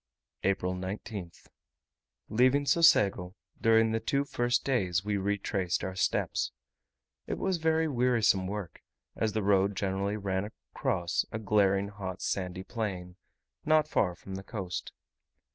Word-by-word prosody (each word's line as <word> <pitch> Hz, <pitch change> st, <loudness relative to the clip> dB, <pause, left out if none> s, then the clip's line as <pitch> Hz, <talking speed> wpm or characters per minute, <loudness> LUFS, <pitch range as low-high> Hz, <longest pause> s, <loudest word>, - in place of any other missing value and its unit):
April 95 Hz, -2 st, 0 dB
19th. 95 Hz, -1 st, -6 dB, 0.8 s
Leaving 130 Hz, +6 st, +3 dB
Socego, 105 Hz, -, +4 dB, 0.3 s
during 115 Hz, 0 st, +4 dB
the 115 Hz, -, +1 dB
two 140 Hz, +5 st, 0 dB
first 120 Hz, -3 st, 0 dB
days, 95 Hz, -9 st, +1 dB
we 105 Hz, -1 st, 0 dB
retraced 100 Hz, -2 st, -1 dB
our 95 Hz, -, -3 dB
steps. 65 Hz, -8 st, 0 dB, 0.8 s
It -, -, -2 dB
was 190 Hz, -2 st, 0 dB
very 160 Hz, 0 st, +2 dB
wearisome 120 Hz, -8 st, +2 dB
work, 100 Hz, -4 st, -6 dB, 0.3 s
as 110 Hz, -1 st, -1 dB
the 110 Hz, -2 st, -1 dB
road 100 Hz, 0 st, +3 dB
generally 100 Hz, +2 st, -1 dB
ran 95 Hz, -2 st, -1 dB
across 90 Hz, -4 st, -2 dB
a -, -, -3 dB
glaring 100 Hz, -2 st, +2 dB
hot 95 Hz, -2 st, -6 dB
sandy 90 Hz, -1 st, -2 dB
plain, 95 Hz, -6 st, -4 dB, 0.5 s
not 155 Hz, -1 st, +3 dB
far 90 Hz, -, +1 dB
from 95 Hz, +3 st, -10 dB
the 95 Hz, 0 st, -5 dB
coast. 95 Hz, -4 st, -5 dB
100 Hz, 130 wpm, -30 LUFS, 95-115 Hz, 0.8 s, Socego